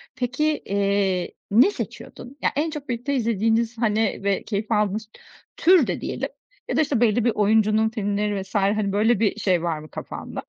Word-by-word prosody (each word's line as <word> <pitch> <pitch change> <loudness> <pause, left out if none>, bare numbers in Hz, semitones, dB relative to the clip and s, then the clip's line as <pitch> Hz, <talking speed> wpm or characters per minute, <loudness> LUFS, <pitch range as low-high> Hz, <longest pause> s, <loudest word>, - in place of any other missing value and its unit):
Peki 250 +4 -2 0.2
,eee, 200 -2 0 0.2
ne 250 - +6
seçiyordun? 265 -7 -8
Ya - - +2
en 305 +4 0
çok 295 -4 -8
birlikte 250 +4 -2
izlediğiniz, 225 0 +1
hani, 220 -2 +1
ve 200 -1 0
keyif 215 +1 -4
aldığınız 210 0 0 0.5
tür 345 -5 +5
de - - -3
diyelim - - -3 0.4
ya - - 0
da - - +5
işte 275 -6 0
belli 230 0 +3
bir 235 - +4
oyuncunun 215 +1 +3
filmleri 205 -2 -1
vs. 190 +3 -12
hani 200 0 +1
böyle 215 +2 +2
bir 210 -2 +1
şey 180 -3 +1
var 165 -3 -1
mı 155 - -12
kafanda? - - -7
215 Hz, 175 wpm, -23 LUFS, 200-240 Hz, 0.5 s, ne